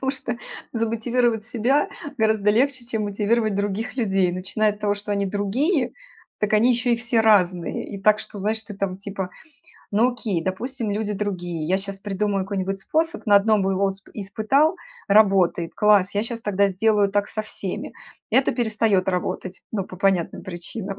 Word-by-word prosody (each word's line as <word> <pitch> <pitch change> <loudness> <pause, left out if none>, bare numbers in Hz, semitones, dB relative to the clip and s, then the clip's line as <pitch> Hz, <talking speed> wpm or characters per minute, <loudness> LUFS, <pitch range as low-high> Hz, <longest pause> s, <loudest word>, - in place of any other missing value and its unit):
Потому 265 0 0
что 255 -3 -4 0.4
замотивировать 230 0 0
себя 245 +5 +1 0.3
гораздо 220 -2 +3
легче, 255 +3 +1
чем 220 -3 -2
мотивировать 210 +1 +1
других 205 +5 -2
людей. 195 -6 +2
Начиная 195 +4 0
от 210 - -14
того, 205 -1 +1
что 205 +1 -7
они 200 0 0
другие, 245 - 0 0.5
так 210 0 -1
они 235 +4 +5
ещё 245 +1 0
и 235 - +3
все 235 -1 +1
разные. 185 -6 +2
И 200 - -6
так, 215 +1 +4
что, 215 - -7
знаешь, 215 +3 -1
ты 205 -1 -9
там, 195 -2 -2
типа: 195 -2 -5 0.6
"Ну, 230 +5 +3
окей, 205 -8 -2
допустим, 230 +5 -3
люди 210 0 -1
другие, 175 -6 -3
я 190 +2 +2
щас 195 0 -5
придумаю 195 -1 -1
какой-нибудь 195 -1 -2
способ, 320 - -1
на 205 - +7
1 210 0 +3
бы 195 0 +1
его 195 +1 +1
усп 195 0 -2
испытал- 220 - +1 0.3
работает, 195 -5 +3
класс, 205 -2 +4
я 205 - +1
щас 230 0 -3
тогда 200 -2 +2
сделаю 205 +1 +2
так 205 0 +1
со 215 - -3
всеми". 200 -3 -6 0.4
Это 265 - +3
перестаёт 220 -5 +1
работать, 185 0 -2
ну, 195 -4 -1
по 185 - -11
понятным 190 -3 0
причинам. 190 +3 -6
205 Hz, 175 wpm, -23 LUFS, 195-225 Hz, 0.6 s, на